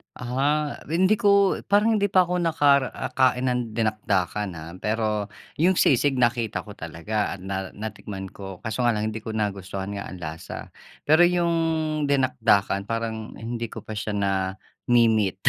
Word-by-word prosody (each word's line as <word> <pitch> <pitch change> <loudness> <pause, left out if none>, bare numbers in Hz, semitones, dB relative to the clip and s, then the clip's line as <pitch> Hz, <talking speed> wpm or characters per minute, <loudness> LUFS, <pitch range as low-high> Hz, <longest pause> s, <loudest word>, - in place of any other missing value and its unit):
Ah, 140 +4 -1
hindi 185 +7 +2
ko 200 -3 +4
parang 210 +2 +3
hindi 200 - +2
pa 190 -2 +4
ako 180 0 0
nakain 140 -5 +2
ng 125 -3 -2
dinakdakan, 105 -3 0
ah. 80 0 -8
Pero 105 0 -1 0.3
yung 180 +5 +4
sisig 140 -3 +3
nakita 120 -2 +1
ko 105 - -12
talaga 85 +6 -3
at 95 - -9
na 95 0 -4
natikman 100 -2 -6
ko 95 -2 -9
kaso 110 +2 -2
nga 120 - +4
lang 110 0 -1
hindi 110 - -5
ko 110 - -4
nagustuhan 100 -2 -3
nga 100 -1 -5
ang 90 -1 -9
lasa. 80 0 -7 0.3
Pero 160 +4 +5
yung 175 -1 +2 0.5
dinakdakan 115 -8 +2
parang 110 0 -4
hindi 115 +1 -4
ko - - -8
pa 110 - -7
siya 105 0 -3
na-me-meet, 100 +2 +1
110 Hz, 150 wpm, -25 LUFS, 100-140 Hz, 0.5 s, Pero